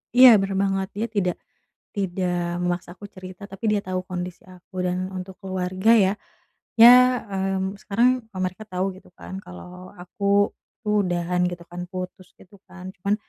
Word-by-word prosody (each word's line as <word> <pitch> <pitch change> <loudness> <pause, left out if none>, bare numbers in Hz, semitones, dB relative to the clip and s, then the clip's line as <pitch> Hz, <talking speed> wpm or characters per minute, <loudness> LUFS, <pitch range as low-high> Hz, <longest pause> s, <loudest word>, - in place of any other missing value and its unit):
iya 250 -2 +10
bener 195 0 -1
banget, 195 -1 0
dia 220 +3 -1
tidak 180 -5 0 0.6
tidak 175 -3 -1
memaksa 175 0 -2
aku 205 - -11
cerita 185 +1 -10
tapi 195 +3 -2
dia 210 - +2
tau 185 0 -2
kondisi 180 -1 -6
aku, 185 0 -7
dan 180 +1 -1
untuk 185 0 -7
keluarga 190 +1 0
ya, 195 -3 +4 0.7
ya, 250 +2 +8
mmm, 195 0 -2
sekarang, 245 +5 +2
eee, 190 - -9
mereka 185 +4 -4
tau 185 +1 -1
gitu 185 - -17
kan 190 - -7
kalau 180 - -11
aku 200 +3 +1 0.3
tuh 210 -1 +3
udahan 175 0 0
gitu 175 -1 -8
kan, 175 0 -6
putus 185 0 -7
gitu 200 +2 -18
kan 185 0 -10 0.2
cuman, 200 +1 +2
190 Hz, 165 wpm, -24 LUFS, 180-200 Hz, 0.7 s, iya